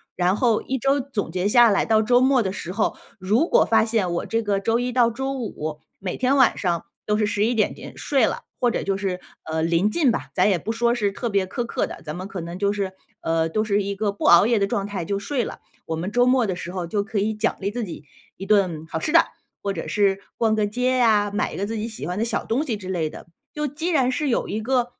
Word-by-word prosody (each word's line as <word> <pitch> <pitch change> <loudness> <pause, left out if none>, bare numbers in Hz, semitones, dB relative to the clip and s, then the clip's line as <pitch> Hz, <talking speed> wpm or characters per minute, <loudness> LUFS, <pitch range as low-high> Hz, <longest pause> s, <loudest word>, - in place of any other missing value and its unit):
然 180 +1 +2
后 230 -1 +2
一 265 0 -2
周 275 +4 +2
总 255 -9 -3
结 185 +2 0
下 240 +2 +6
来， 200 - +2
到 220 -1 +3
周 245 +3 +4
末 260 -1 +4
的 190 -4 -1
时 180 -2 -6
候， 210 +3 0 0.2
如 210 - +2
果 - - +4
发 220 -1 +3
现 220 -6 0
我 175 - -2
这 230 - 0
个 205 -3 0
周 225 +4 +1
一 250 0 -1
到 240 -1 +3
周 265 +4 -3
五， 155 - -4 0.2
每 185 -2 -4
天 260 +2 +2
晚 260 -3 +4
上 175 -3 -1 0.2
都 210 - +1
是 210 - +2
11 210 +3 +1
点 220 -3 +2
点 - - -10
睡 270 -5 +2
了， - - -3
或 245 -1 +2
者 - - -1
就 195 - -1
是， 190 -2 -2 0.2
呃， 160 0 -2
临 170 +5 +2
近 290 +2 +3
吧， - - -4
咱 - - +3
也 190 - +3
不 215 - -4
说 235 +1 +1
是 205 -4 0
特 235 +4 -3
别 200 -3 +1
苛 235 +6 -3
刻 - - -1
的， - - -9
咱 150 0 -5
们 185 +2 -6
可 195 - -5
能 170 +1 -6
就 200 +1 +1
是， 200 -2 -3 0.3
呃， 165 0 0
都 215 +6 0
是 205 -1 +1
一 200 +1 -2
个 200 0 -1
不 205 - -8
熬 170 +3 +7
夜 235 0 +3
的 200 - +2
状 195 0 -2
态 200 -4 -4
就 200 +4 -2
睡 245 +5 -1
了， - - -7 0.3
我 160 - -3
们 175 +4 -3
周 245 +3 +3
末 250 -2 +3
的 185 - -1
时 175 0 -6
候 180 -2 -4
就 200 +4 -1
可 215 0 -2
以 215 +2 0
奖 215 +2 0
励 200 - -1
自 235 +3 -3
己 170 -7 -8 0.3
一 195 - -6
顿 185 -7 +2
好 160 - -3
吃 300 - -2
的， 335 0 +6 0.4
或 200 -1 -2
者 165 - -5
是 200 -1 +2 0.2
逛 220 -2 +2
个 215 -1 +1
街 250 +5 0
啊， 215 -4 +4
买 205 +1 -1
一 - - -7
个 200 - -1
自 225 +2 -4
己 220 +1 -3
喜 220 - -7
欢 180 +1 -3
的 215 - +1
小 230 - -2
东 255 +7 0
西 230 -7 -2
之 190 -2 -9
类 170 -4 -1
的。 - - -11 0.3
就 300 0 -2
既 305 +5 -3
然 270 -7 +3
是 280 +3 -1
有 235 - 0
一 215 +2 -3
个 250 +1 +1
210 Hz, 290 characters per minute, -23 LUFS, 190-240 Hz, 0.4 s, 熬